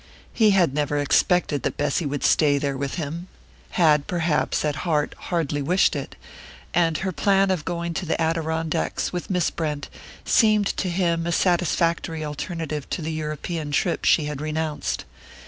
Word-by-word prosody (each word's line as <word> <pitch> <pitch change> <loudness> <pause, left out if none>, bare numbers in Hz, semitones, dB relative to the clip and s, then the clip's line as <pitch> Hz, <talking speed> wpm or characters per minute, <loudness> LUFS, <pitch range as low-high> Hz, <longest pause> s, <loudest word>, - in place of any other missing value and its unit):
He 220 -2 +4
had 180 -8 +3
never 145 0 0
expected 145 +1 +2
that - - -2
Bessy 145 +2 0
would 145 0 -3
stay 145 -3 +4
there 140 -1 -1
with 140 0 -3
him 170 +2 -5 0.5
had 150 -4 +4
perhaps, 165 -4 0
at 150 -1 -1
heart, 150 -4 0
hardly 155 -4 -2
wished 180 +6 +2
it 140 - -5 0.6
and 165 -2 +2
her 190 0 -2
plan 195 +2 +2
of 175 -5 -2
going 170 -1 -3
to 185 +1 -4
the - - 0
Adirondacks 160 0 -1
with 175 - -4
Miss 180 -3 +1
Brent 150 -3 -3 0.4
seemed 215 -3 +4
to 185 - -1
him 170 -2 0
a - - 0
satisfactory 170 -2 +1
alternative 150 -1 -4
to 170 - -3
the 160 +1 -3
European 155 +1 -4
trip 165 +4 0
she 155 - +4
had 150 -1 -4
renounced. 155 - -2
160 Hz, 165 wpm, -24 LUFS, 150-175 Hz, 0.6 s, He